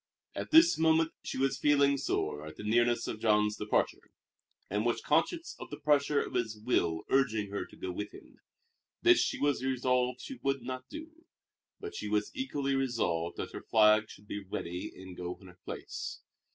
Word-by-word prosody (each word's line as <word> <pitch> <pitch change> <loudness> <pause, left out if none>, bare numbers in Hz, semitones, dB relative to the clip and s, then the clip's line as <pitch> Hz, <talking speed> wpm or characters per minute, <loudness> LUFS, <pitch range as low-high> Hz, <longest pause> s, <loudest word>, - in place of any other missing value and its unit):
At - - -5
this 330 - +6
moment 160 0 +4
she - - -5
was 135 0 +1
feeling 140 -1 +4
sore 105 - -2
at 80 - -9
the - - -9
nearness 120 +2 +2
of 110 - -4
Jean's 105 -1 +3
departure, 105 - -1 0.6
and 105 +2 -1
was 120 0 +1
conscious 325 - 0
of - - -8
the 145 - -7
pressure 145 -1 +3
of - - -8
his 115 -3 -1
will 85 -8 0
urging 110 -7 +2
her 100 - -3
to - - -16
go 95 - -5
with 105 +3 -5
him. - - -15 0.6
This 350 0 +7
she - - +1
was 145 -3 +1
resolved 125 -1 +1
she 270 - -8
would 135 0 0
not 130 0 -6
do; 320 +1 -10 0.5
but 420 0 -7
she - - -5
was 105 0 0
equally 145 - -2
resolved 110 -11 0
that - - -4
her - - -6
flag 110 0 +4
should 100 - -13
be 100 -1 -5
ready 90 -1 -5
and 95 -1 -10
go 90 0 -5
in 95 - -16
her 90 -1 -15
place. - - -6
125 Hz, 190 wpm, -31 LUFS, 105-145 Hz, 0.6 s, This